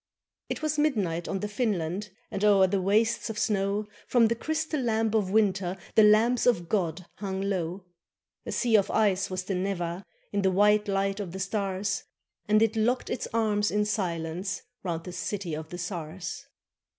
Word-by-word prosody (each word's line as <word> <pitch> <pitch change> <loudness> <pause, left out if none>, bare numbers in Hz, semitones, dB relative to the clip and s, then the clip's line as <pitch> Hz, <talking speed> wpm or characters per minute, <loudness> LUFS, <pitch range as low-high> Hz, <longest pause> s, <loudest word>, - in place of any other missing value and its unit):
It - - -4
was 305 -1 0
midnight 195 - 0
on 195 - -2
the 210 - -1
Finland, 205 -3 -1 0.2
And, 200 - -3
o'er 200 -2 +6
the 190 +1 0
wastes 215 +5 +2
of 220 - -5
snow. 205 0 0 0.2
From 235 -3 +4
the 230 - +1
crystal 315 +2 -2
lamp 225 -2 +1
of 210 -4 +2
winter 195 -3 +1 0.2
The 220 - +6
lamps 220 +4 +5
of 175 -9 +2
God 175 -3 -1
hung 190 -2 -3
low. 185 -2 -2 0.6
A - - -5
sea 235 -3 +2
of 200 - +1
ice 195 -3 +2
was 185 0 -3
the 195 - -3
Neva, 180 -1 -2 0.3
In 205 - 0
the 190 - +3
white 210 +2 +4
light 195 0 0
of 185 -4 -5
the 190 - -5
stars, 195 0 -1 0.4
And 215 +1 +5
it 225 0 +1
locked 240 +4 +1
its - - -2
arms 210 -2 +1
in 210 0 +1
silence 180 -2 -2 0.2
Round 170 -3 -3
the 180 - -7
city 180 -1 -3
of 155 +1 -5
the 175 - -6
czars. 175 -1 -5
200 Hz, 180 wpm, -28 LUFS, 185-215 Hz, 0.6 s, o'er